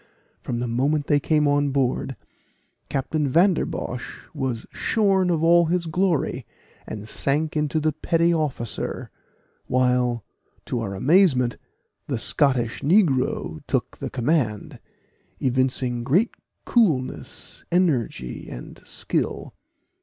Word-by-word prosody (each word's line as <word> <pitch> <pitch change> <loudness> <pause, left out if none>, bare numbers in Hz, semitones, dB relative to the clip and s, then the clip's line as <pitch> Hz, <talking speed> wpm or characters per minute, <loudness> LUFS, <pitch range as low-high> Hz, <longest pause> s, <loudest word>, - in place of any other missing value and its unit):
From 120 - -3
the 120 - -2
moment 140 +5 +1
they 145 0 +3
came 150 0 +2
on 145 0 +2
board, 135 -1 0 0.7
Captain 145 +2 -1
Vanderbosh 165 -5 0
was 125 -4 -3
shorn 195 -4 +2
of 165 -2 +1
all 170 +1 +6
his 175 +1 0
glory, 160 -5 0 0.4
and 105 0 -6
sank 150 +7 0
into 150 +1 +1
the 155 0 +1
petty 165 +3 +1
officer 140 -9 -2 0.6
while, 125 -3 +1 0.4
to 120 - -2
our 100 -4 -3
amazement, 130 - +3 0.5
the - - -1
Scottish 125 -5 +1
negro 140 - +2
took - - -2
the - - -4
command, 125 -5 -1 0.6
evincing 130 -1 0
great 175 - +2 0.3
coolness, 165 - 0
energy, 130 - 0
and - - -9
skill. - - -3
140 Hz, 110 wpm, -24 LUFS, 125-165 Hz, 0.7 s, all